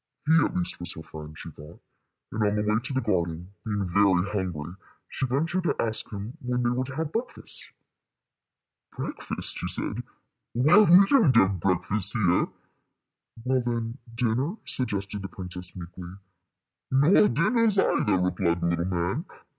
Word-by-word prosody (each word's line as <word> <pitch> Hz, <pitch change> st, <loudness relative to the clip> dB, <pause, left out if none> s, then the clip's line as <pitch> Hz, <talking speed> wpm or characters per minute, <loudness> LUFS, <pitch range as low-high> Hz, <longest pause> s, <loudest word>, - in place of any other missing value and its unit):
He 155 Hz, -, +3 dB
at -, -, -2 dB
least 180 Hz, -1 st, -3 dB
was 90 Hz, 0 st, -5 dB
her 80 Hz, -, -9 dB
friend, 75 Hz, 0 st, -10 dB
she 80 Hz, -, -9 dB
thought; 75 Hz, +3 st, -13 dB, 0.5 s
and 110 Hz, -, -3 dB
on 105 Hz, 0 st, +2 dB
the 105 Hz, -, 0 dB
way 105 Hz, +1 st, +1 dB
to 130 Hz, -, -6 dB
the 130 Hz, -, 0 dB
garden, 90 Hz, -3 st, -2 dB
being 105 Hz, -3 st, -2 dB
very 95 Hz, 0 st, +3 dB
hungry, 90 Hz, -6 st, -4 dB, 0.3 s
she 135 Hz, -, -3 dB
ventured 165 Hz, +8 st, -1 dB
to -, -, +1 dB
ask 110 Hz, +1 st, 0 dB
him 105 Hz, +2 st, -7 dB
when 125 Hz, 0 st, -1 dB
they 120 Hz, -, +2 dB
were 130 Hz, +1 st, -1 dB
to 130 Hz, 0 st, -8 dB
have 160 Hz, 0 st, -3 dB
breakfast. 240 Hz, +5 st, -6 dB, 1.3 s
"Breakfast!" -, -, -2 dB
he -, -, -3 dB
said. -, -, -2 dB, 0.5 s
"Why, 140 Hz, -, +5 dB
we 195 Hz, -1 st, +7 dB
don't 195 Hz, -, +4 dB
have 95 Hz, -4 st, +4 dB
breakfasts 95 Hz, +3 st, +4 dB
here." 95 Hz, -6 st, +2 dB, 1.0 s
"Well, 130 Hz, 0 st, +1 dB
then, 120 Hz, +1 st, -3 dB, 0.2 s
dinner," 125 Hz, -, 0 dB
suggested 100 Hz, -5 st, -2 dB
the 95 Hz, -, -5 dB
princess, 90 Hz, -1 st, -6 dB
meekly. 90 Hz, 0 st, -9 dB, 0.8 s
"Nor 145 Hz, +10 st, +5 dB
dinners 220 Hz, +5 st, +2 dB
either," 105 Hz, -, +2 dB
replied 90 Hz, -1 st, 0 dB
the 85 Hz, -, -1 dB
little 85 Hz, 0 st, -1 dB
man. 90 Hz, -, -2 dB
105 Hz, 160 wpm, -26 LUFS, 90-130 Hz, 1.3 s, we